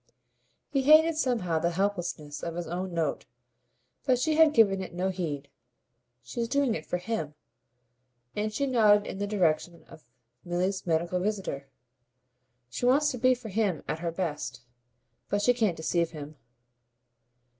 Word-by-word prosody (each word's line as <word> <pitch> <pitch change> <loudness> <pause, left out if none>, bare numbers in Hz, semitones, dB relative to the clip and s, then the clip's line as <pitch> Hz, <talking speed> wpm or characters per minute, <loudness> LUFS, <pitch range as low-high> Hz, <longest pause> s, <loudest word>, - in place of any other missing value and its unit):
He 275 -2 +2
hated 310 +4 +6
somehow 225 - 0
the 170 +2 +1
helplessness 175 -7 -2
of 170 -1 -4
his 175 0 -3
own 180 +2 -4
note; 165 -2 -2 0.8
but 255 -3 +3
she 310 +6 +1
had 320 -1 +6
given 200 -7 +4
it 185 - -7
no 185 +2 0
heed. 155 -7 -4 0.8
"She's 230 - -3
doing 275 -1 +1
it 155 - -5
for 180 - -1
HIM" 180 -6 -4 1.0
and 215 +1 -1
she 280 +6 -1
nodded 210 -5 +4
in - - -6
the 205 - -1
direction 175 -4 0
of 155 - -16 0.4
Milly's 180 +2 -2
medical 170 +2 +1
visitor. 185 -9 -3 1.0
"She 125 - -2
wants 290 +3 +4
to 250 - -6
be 255 +1 +4
for 240 -3 -9
him 200 -5 0
at 160 - -2
her 170 0 -2
best. 150 -9 -4 0.7
But 205 0 0
she 245 - +5
can't 220 -8 0
deceive 170 +1 0
him." 150 -1 -9
190 Hz, 155 wpm, -28 LUFS, 170-235 Hz, 1.0 s, hated